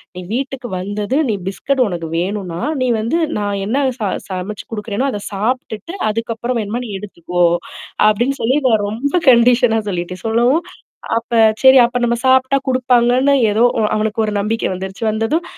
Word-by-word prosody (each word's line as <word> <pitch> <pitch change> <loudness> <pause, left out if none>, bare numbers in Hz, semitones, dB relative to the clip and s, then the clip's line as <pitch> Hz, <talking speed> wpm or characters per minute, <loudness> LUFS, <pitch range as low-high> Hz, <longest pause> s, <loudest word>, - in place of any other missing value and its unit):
"நீ 180 - -6
வீட்டுக்கு 265 0 -3
வந்தது, 205 +5 -3
நீ - - +1
பிஸ்கட் 265 +7 -1
உனக்கு 170 -4 -4
வேணுனா, 180 -2 -3 0.2
நீ 255 - +1
வந்து 230 +10 0 0.2
நான் 205 -1 -2
என்ன 220 +6 -1 0.2
ச - - -11 0.3
சமைச்சு 190 +2 -5
குடுக்குறேன்னோ, 210 +4 -2
அத 205 -4 -5
சாப்டுட்டு 240 - -3
அதுக்கப்புறம் 230 +2 -2
வேணுமா 220 +4 -3
நீ - - -8
எடுத்துக்கோ!" 175 -3 -3 0.6
அப்பிடின்னு 240 +6 +1
சொல்லி 255 +5 +2
நான் 215 -3 +2
ரொம்ப 245 +7 -3 0.2
கண்டிஷனா 240 -1 +4
சொல்லிட்டேன். 180 0 -5
சொல்லவும். 240 +9 +2 0.6
அப்ப 230 +1 -13 0.3
சரி 265 0 +8
அப்ப 245 0 -3
நம்ம 235 0 0
சாப்டா 260 +1 +4
குடுப்பாங்கன்னு 255 +2 +3 0.2
ஏதோ 225 +3 +3 0.2
அ - - +2
அவனுக்கு 220 +1 0
ஒரு 210 - -3
நம்பிக்கை 220 +2 -1
வந்துருச்சு. 190 +4 -6
வந்ததும் 225 +11 -1
225 Hz, 155 wpm, -17 LUFS, 205-250 Hz, 0.6 s, சரி